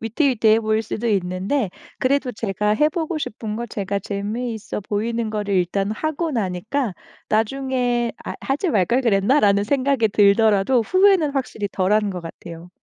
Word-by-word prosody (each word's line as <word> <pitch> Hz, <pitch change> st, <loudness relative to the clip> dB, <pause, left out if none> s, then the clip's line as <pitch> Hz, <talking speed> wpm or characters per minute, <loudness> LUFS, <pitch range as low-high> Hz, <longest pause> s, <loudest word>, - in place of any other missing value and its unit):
위태위태해 225 Hz, -2 st, +2 dB
보일 220 Hz, 0 st, 0 dB
수도 225 Hz, +2 st, -3 dB
있는데 195 Hz, +4 st, 0 dB, 0.3 s
그래도 265 Hz, 0 st, +1 dB
제가 210 Hz, -1 st, -1 dB
해 300 Hz, +7 st, +3 dB
보고 325 Hz, 0 st, -3 dB
싶은 215 Hz, -6 st, -4 dB
거 235 Hz, -, -3 dB
제가 200 Hz, -2 st, -3 dB
재미있어 215 Hz, +2 st, -4 dB
보이는 220 Hz, +3 st, -2 dB
거를 205 Hz, -2 st, -2 dB
일단 195 Hz, +3 st, 0 dB
하고 310 Hz, +6 st, -2 dB
나니까 215 Hz, +2 st, -2 dB, 0.4 s
나중에 245 Hz, +1 st, 0 dB
'아 -, -, -5 dB
하지 290 Hz, +7 st, -1 dB
말걸 235 Hz, -, +2 dB
그랬나?'라는 205 Hz, -2 st, +3 dB
생각이 265 Hz, -1 st, +1 dB
들더라도 210 Hz, +3 st, +4 dB
후회는 370 Hz, -, +4 dB
확실히 255 Hz, -7 st, -3 dB
덜한 205 Hz, +2 st, +1 dB
것 180 Hz, -, -5 dB
같아요. 170 Hz, +1 st, -10 dB
220 Hz, 340 characters per minute, -21 LUFS, 200-260 Hz, 0.4 s, 들더라도